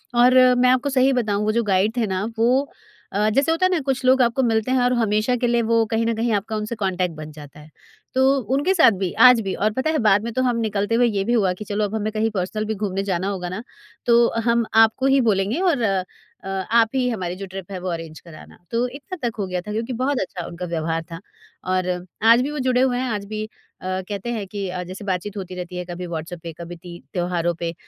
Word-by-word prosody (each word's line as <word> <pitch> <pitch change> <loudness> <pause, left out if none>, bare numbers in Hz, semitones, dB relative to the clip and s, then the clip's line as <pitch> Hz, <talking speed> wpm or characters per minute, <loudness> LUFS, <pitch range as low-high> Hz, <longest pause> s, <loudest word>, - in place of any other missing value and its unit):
और 245 +1 +6 0.2
मैं 250 0 +4
आपको 255 +3 +2
सही 265 0 +3
बताऊँ, 210 -4 0
वो 215 - +1
जो 235 +2 +1
गाइड 205 +2 +1
थे 225 -3 +1
ना, 190 +1 -2
वो 255 +5 +2 0.4
अ, 210 +2 +1
जैसे 275 +8 +2
होता 330 +3 +2
है 370 - +2
ना, 350 - +2
कुछ 270 -1 -2
लोग 260 0 +5
आपको 245 +2 +2
मिलते 225 +1 +1
हैं 260 - +3
और 250 0 +2
हमेशा 220 +1 +1
के 245 - +2
लिए 235 0 +2
वो 230 0 +2
कहीं 225 0 +1
न 230 - +1
कहीं 230 +1 0
आपका 210 +2 -2
उनसे 215 +2 -3
कॉन्टैक्ट 185 -4 -1
बन 155 0 -8
जाता 150 -1 -12
है। 150 +1 -14 0.4
तो 260 0 +3 0.3
उनके 355 +8 +2
साथ 325 -10 +6
भी, 185 -3 0
आज 250 -2 +7
भी, 195 -2 -3
और 215 +2 0
पता 260 +6 -1
है 315 - +1
बाद 205 +1 +4
में 235 - -3
तो 255 - 0
हम 245 -2 +1
निकलते 210 0 0
हुए 240 0 +4
ये 200 -3 0
भी 235 - 0
हुआ 195 -6 +2
कि, 210 +4 -9
"चलो 205 +1 -1
अब 210 +2 -4
हमें 215 0 -2
कहीं 220 +1 +1
पर्सनल 205 +2 -2
भी 220 +1 -2
घूमने 195 -1 -2
जाना 190 -1 -1
होगा 185 -3 -3
ना, 200 +5 -5 0.4
तो 235 0 +5 0.2
हम 235 0 +2 0.2
आपको 225 +4 +1
ही 270 - +4
बोलेंगे 195 - 0
और 245 - -1 0.6
अ, - - -8 0.2
आप 230 -1 +4
ही 255 -1 +1
हमारी 180 -6 -3
जो 195 +1 -6
ट्रिप 190 0 -9
है 185 - -4
वो 185 - -4
अरेंज 165 -2 -6
कराना।" 165 -3 -14
तो 235 +2 +1
इतना 290 +9 -8
तक 230 - -4
हो 195 - -1
गया 180 -1 -3
था 210 - -8
क्योंकि 230 +4 -3
बहुत 275 -1 +1
अच्छा 180 -2 -5
उनका 175 +1 -6
व्यवहार 165 -1 -2
था। 165 - -6 0.4
और 185 0 0 0.4
आज 240 +2 +6
भी 280 - -2
वो 295 - -4
जुड़े 255 -1 +2
हुए 250 -2 +2
हैं, 255 0 -2
आज 205 -2 -3
भी 215 +1 -5 0.3
अ, 185 0 -2
कहते 205 +3 -4
हैं 215 -4 -3
कि 200 0 -4
अ, 180 0 -4
जैसे 185 +3 -9
बात-चीत 190 +2 -3
होती 185 -1 -6
रहती 180 0 -7
है, 180 - -3
कभी 175 0 -6
व्हाट्सएप 165 +1 -6
पे, 165 - -5
कभी 170 +1 -7
ती 175 0 -11
त्योहारों 175 -1 0
पे। 170 0 -4
215 Hz, 255 wpm, -22 LUFS, 185-240 Hz, 0.6 s, आज